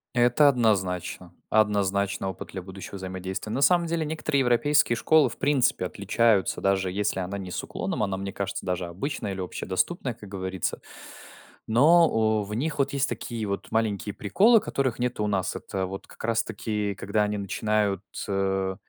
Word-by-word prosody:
Это 120 +4 +5
однозначно. 95 -8 0 0.2
Однозначный 100 -2 +1
опыт 95 - -6
для 95 - -6
будущего 95 +2 -9
взаимодействия. 95 +2 -5
На 135 - -1
самом 170 +4 +4
деле, 165 -1 -1
некоторые 155 -2 0
европейские 125 +1 +3
школы 155 +4 +4
в - - -10
принципе 135 -9 +2
отличаются, 100 +2 +1
даже 95 -1 +1
если 100 0 -1
она 95 +2 -3
не 95 -2 -6
с - - -3
уклоном, - - -3
она, 100 -2 -1
мне 100 0 -4
кажется, 100 0 -4
даже 90 -1 -1
обычная 100 - -4
или 95 - -5
общедоступная, 95 - -2
как 105 -3 -13
говорится. 95 -2 -3 0.9
Но, 115 -5 +4
э, - - -12
в 105 - -6
них 150 +7 -2
вот 140 - +1
есть 140 0 +1
такие 115 -3 -4
вот 100 0 -4
маленькие 105 -2 0
приколы, 210 - +4
которых 130 -8 -1
нету 120 -3 -1
у - - 0
нас. 95 -2 -1
Это 95 -1 -3
вот 95 +1 -7
как - - -13
раз 115 0 +1
таки 105 -1 -3
когда 100 +3 0
они 105 0 -1
начинают, 100 0 0 0.2
э, 95 -1 0
105 Hz, 170 wpm, -26 LUFS, 95-120 Hz, 0.9 s, Это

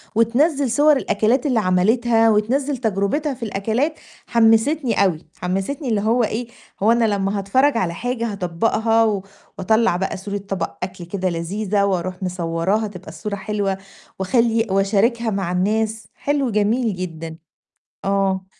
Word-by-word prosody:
وتِنزّل 265 +4 +2
صور 295 +4 +5
الأكلات 245 +1 +1
اللي 255 -6 +2
عملِتها 225 +5 +3
وتِنزّل 260 +7 +1
تجربتها 225 +6 -1
في 240 - -9
الأكلات، 225 +9 -1 0.3
حمسِتني 230 +2 +3
أوي، 165 -4 -2
حمسِتني 195 - -3
اللي 215 -3 +1
هو 230 +3 +2
إيه، 225 +2 -2 0.4
هو 220 - +5
أنا 235 0 +3
لمّا 200 -1 0
هاتفرج 255 +7 +2
على 175 -5 0
حاجة، 235 +3 -2
هاطبقها 215 +3 +1 0.4
وأطلّع 220 0 +2
بقى 190 +2 -2
صورة 200 +2 -4
طبق 195 -4 -4
أكل 180 -1 -6
كده 185 +1 -2
لذيذة 200 +4 -1
وأروح 185 -1 -2
مصورَّاها 180 +4 -1
تبقى 185 -4 -10
الصورة 185 +6 -5
حلوة 200 -1 -2 0.4
واخلّي 230 +3 +2
واشارِكها 215 +4 +2
مع 195 -3 -2
الناس، 215 +3 0
حلو، 280 -2 0
جميل 215 +1 +1
جدًا 165 -3 -6 0.7
آه. 195 -1 +1
210 Hz, 135 wpm, -21 LUFS, 190-235 Hz, 0.7 s, صور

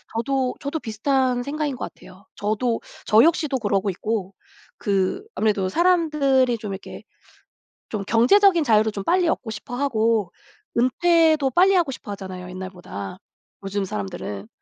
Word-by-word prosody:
저도, 260 +2 0
저도 285 +3 -3
비슷한 250 +1 0
생각인 290 0 -2
것 - - -6
같아요. 185 +2 -16
저도 225 +3 -1 0.3
저 215 +2 +6
역시도 310 -4 +2
그러고 205 -3 0
있고 200 0 -3 0.4
그 195 - -1
아무래도 205 -3 +1
사람들이 295 - +2
좀 210 -2 -6
이렇게 190 - -9 0.9
좀 210 -3 -3
경제적인 335 - +5
자유를 220 -4 +3
좀 200 -2 -5
빨리 360 - +2
얻고 255 -7 -1
싶어 220 +3 -6
하고 225 -7 +1 0.5
은퇴도 315 +3 +3
빨리 375 +8 +5
하고 340 -6 +2
싶어 215 - -8
하잖아요 185 -2 -7
옛날보다 180 - -7 0.5
요즘 195 +1 -2
사람들은. 100 - -5
230 Hz, 320 characters per minute, -23 LUFS, 200-285 Hz, 0.9 s, 저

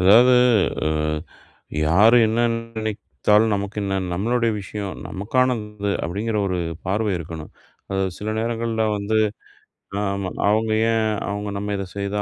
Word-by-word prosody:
அதாவது. 115 +7 +7 0.5
அ, - - +3 1.0
யாரு 105 +9 +6
என்ன 110 +2 0 0.2
நினைத்தாலும் 110 -1 0
நமக்கு 100 +1 -4
என்ன? 95 -1 -1
நம்மளுடைய 115 +4 +1
விஷயம். 100 0 -5
நமக்கானது. 105 -1 -1
அப்டிங்கிற 105 +5 -2
ஒரு 90 -1 -1 0.3
பார்வை 100 +2 0
இருக்கணும். 80 -1 -7 0.4
அது 95 0 +1 0.2
சில 105 - -5
நேரங்கள்ல 115 -1 -1
வந்து 105 +2 0 0.8
அ, - - 0
ஆமா. 100 -2 -3 0.2
அவங்க 110 +1 +2 0.2
ஏன், 110 -1 +1 0.2
அவங்க 105 0 -3
நம்ம 105 +1 -3
இத 100 - -3
செய்தா 100 +1 -1
105 Hz, 130 wpm, -22 LUFS, 100-115 Hz, 1.0 s, அதாவது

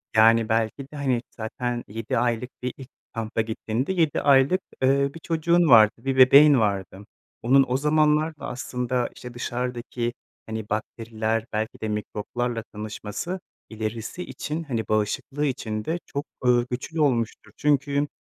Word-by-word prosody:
Yani 115 +1 +5
belki 110 +4 0
de - - -10
hani 130 -4 0
zaten 120 +2 -4
7 110 +2 -3
aylık 120 +1 0
bir 125 0 -3
ilk 135 -1 -11 0.2
kampa 115 -1 -2
gittiğinde 115 +7 -2
7 165 -5 +1
aylık, 140 +6 +4 0.2
eee, 140 +1 +3
bir 165 - -9
çocuğun 170 +1 +2
vardı, 110 -3 +8
bir 130 +3 -2
bebeğin 140 +2 +8
vardı. 100 -2 -2 0.4
Onun 135 +3 +5
o 125 - +1
zamanlar 150 +2 +2
da - - -6
aslında, 125 -1 -2
işte, 125 -1 -9
dışarıdaki 120 -1 -3 0.3
hani 110 -1 -5
bakteriler, 110 0 -2
belki 110 +1 -3
de 110 - -2
mikroplarla 115 +3 -3
tanışması 105 - -5 0.3
ilerisi 110 - -4
için, 150 +4 -4
hani 120 -7 -3
bağışıklığı 110 +7 -1
için 110 -6 -3
de 165 +2 -1
çok, 140 +1 -4 0.2
ııı, 120 -1 +4
güçlü 150 +6 -3
olmuştur. 115 -6 0
Çünkü, 145 0 +1
125 Hz, 145 wpm, -25 LUFS, 110-140 Hz, 0.4 s, vardı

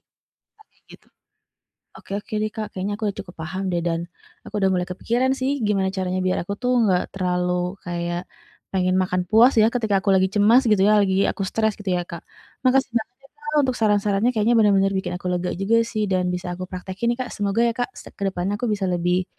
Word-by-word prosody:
yang - - -64 0.5
kayak - - -36
gitu. - - -18 0.9
Oke - - -11
oke - - -23
deh 215 - -1
Kak, 215 -1 -4
kayaknya 195 +2 -3
aku 215 - -10
udah - - -12
cukup 180 -2 -11
paham 175 +5 -4
deh 175 - +1
dan, 165 0 -1 0.4
aku - - -12
udah 190 0 +3
mulai 180 -1 0
kepikiran 245 +7 0
sih 260 +1 +1 0.2
gimana 195 -2 +1
caranya 185 0 -1
biar 185 - +1
aku 200 - -4
tuh 250 0 +1
nggak 185 -3 +3
terlalu 180 -1 0 0.3
kayak, 175 0 -3 0.5
pengen 185 -1 0
makan 180 -1 0
puas 230 +6 +5
ya 215 - +6
ketika 220 -5 0
aku 195 - +3
lagi 190 0 +4
cemas 210 +6 +4
gitu 205 -3 +4
ya, 210 0 +5
lagi 195 0 +2
aku - - -5
stres 220 -1 +1
gitu 205 -2 -3
ya 175 - -2
Kak, 170 -1 -9 0.4
makasih 265 0 +2
banget 235 +1 -2
ya - - -17
Kak, 300 0 -6
untuk 255 -1 0
saran-sarannya 210 +1 +2
kayaknya 215 +3 +3
bener-bener 195 -2 +4
bikin 185 -2 -2
aku 180 - -9
lega 180 0 -1
juga 195 +4 +2
sih 225 -2 -1
dan 180 -1 +1
bisa 180 0 -3
aku 185 +1 -7
praktekin 190 +5 -4
nih - - -30
Kak, - - -8
semoga 205 +2 -1
ya - - 0
Kak, 245 +1 -2
se - - -10
ke - - -12
depannya 190 +2 -2
aku 245 - -1
bisa 205 -2 -1
lebih, 180 +1 +1
195 Hz, 220 wpm, -23 LUFS, 180-220 Hz, 0.9 s, ya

